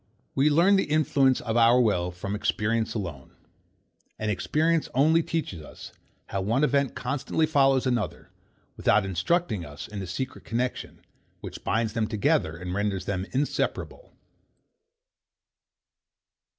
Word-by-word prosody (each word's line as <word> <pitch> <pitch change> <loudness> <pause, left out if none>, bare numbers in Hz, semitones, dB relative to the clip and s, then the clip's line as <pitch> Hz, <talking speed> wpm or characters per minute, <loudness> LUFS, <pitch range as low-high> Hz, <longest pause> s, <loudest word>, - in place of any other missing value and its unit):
We 140 +3 +3
learn 175 +7 +5
the 195 - +1
influence 140 -3 +3
of 115 -2 -3
our 120 +1 +5
will 95 -7 +2
from 90 +3 -5
experience 110 +2 -1
alone. 85 -11 -6 0.8
And 110 -1 -1
experience 160 - +1
only 155 +5 +4
teaches 155 - -3
us, 75 - -11 0.3
how 100 - -3
one 115 +9 +1
event 140 -3 +1
constantly 140 +5 -1
follows 135 -4 +3
another; 120 -4 -2 0.4
without 105 - +2
instructing 95 - 0
us 75 -2 -9
in 105 -1 -7
the 95 - -5
secret 130 +9 -5
connexion, 125 +2 -4 0.4
which - - -8
binds 110 -1 0
them 115 -2 0
together, 100 -6 +1
and 90 +1 -5
renders 100 -1 -1
them 95 0 -2
inseparable. 145 - -2
115 Hz, 130 wpm, -26 LUFS, 100-140 Hz, 0.8 s, learn